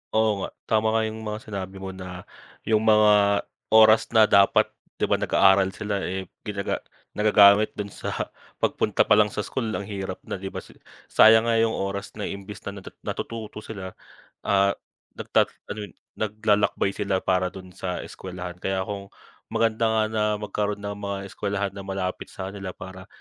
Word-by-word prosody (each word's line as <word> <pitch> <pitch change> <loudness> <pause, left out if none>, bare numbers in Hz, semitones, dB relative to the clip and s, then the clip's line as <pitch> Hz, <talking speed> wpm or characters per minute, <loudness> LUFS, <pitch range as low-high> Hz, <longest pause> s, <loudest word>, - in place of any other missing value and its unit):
Oo 110 -2 +3
nga. - - -3 0.2
Tama 110 0 +3
nga 110 - +3
'yong 110 0 -4
mga 105 -1 -4
sinabi 100 -4 -6
mo 95 - -4
na, 90 -1 -8 0.4
'yong 110 -1 +2
mga 105 -2 +4 0.3
oras 110 0 +7
na 110 - +8
dapat, 100 -2 +4 0.2
'di - - -4
ba, - - +2
nag-aaral 95 0 +4
sila, 105 0 -2
eh, 95 0 -4 0.2
ginaga 100 -1 -2 0.4
nagagamit 105 0 +6
do'n 100 -1 -4
sa - - -5 0.5
pagpunta - - +1
pa 105 - +4
lang 105 - +5
sa 105 - -1
school 125 -4 -3
ang 100 - -3
hirap 95 -2 -5
na, - - -5
'di 95 - -5
ba. - - -5 0.5
Sayang 110 +1 +7
nga 115 - +3
'yong 115 0 +2
oras 100 0 -4
na 105 - -5
imbis 100 +1 -7
na 100 0 -6
natu 95 - -11
natututo 110 -2 -5
sila, 100 -4 -7 0.6
ah, 100 0 +4 0.4
nagta - - +1 0.2
ano 105 - -5
'yon, - - -19 0.2
naglalakbay 105 -2 +1
sila 100 -2 0
para 90 -1 0
do'n 95 -2 -12
sa 90 -2 -3
eskwelahan. 90 -1 -7
Kaya 95 -1 -1
kung 100 -1 -6 0.4
maganda 115 0 +2
nga 110 -1 +2
na 110 -1 0 0.2
magkaroon 105 -1 -2
ng 100 0 -4
mga 100 -1 -3
eskwelahan 100 0 -2
na 100 - -7
malapit 95 -1 -3
sa 95 0 -6
kanila, 100 -2 -6
para 95 +1 -10
100 Hz, 175 wpm, -25 LUFS, 95-110 Hz, 0.6 s, na